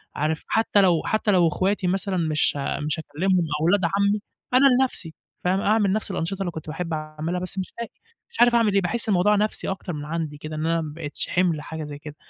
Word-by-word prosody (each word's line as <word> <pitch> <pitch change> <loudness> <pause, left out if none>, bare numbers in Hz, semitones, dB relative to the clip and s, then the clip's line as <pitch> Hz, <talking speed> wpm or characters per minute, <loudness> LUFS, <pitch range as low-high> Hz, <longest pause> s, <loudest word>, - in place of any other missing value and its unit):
عارف، 155 +2 -1
حتى 220 -2 +3
لو 175 -4 +4
حتى 215 -1 +1
لو 180 -3 +4
اخواتي 190 +3 0
مثلًا 190 +1 0
مش 155 -3 +2
ها 140 - -2
مش 150 +2 -1
هاكلمهم 175 +4 0
أو 155 - 0
ولاد 190 +3 +3
عمي 200 +4 +1 0.3
أنا 265 +2 +7
لنفسي 180 -11 -1 0.3
فاهم، 185 +2 +2
أعمل 210 -2 +2
نفس 215 -1 -1
الأنشطة 185 +1 -3
اللي 180 -3 -1
كنت 160 -1 -8
باحب 165 +2 -4
اعملها 155 +3 -3
بس 185 +1 -4
مش 185 - -5
لاقي، 235 - -5 0.4
مش 460 - -12
عارف 240 0 +6
اعمل 225 -3 +3
إيه. 200 - +3
باحس 220 +5 0
الموضوع 205 +2 +4
نفسي 210 +1 0
أكتر 190 -2 -4
من 145 -1 -5
عندي 155 -1 -4
كده 155 +1 -7
إن 155 - -2
أنا 165 0 +1
ما 150 -2 -6
بقيتش 150 -3 -5
حِمل 175 -4 +1
حاجة 160 0 -6
زي 145 -1 -7
كده، 150 -1 -10
180 Hz, 225 wpm, -24 LUFS, 155-200 Hz, 0.4 s, أنا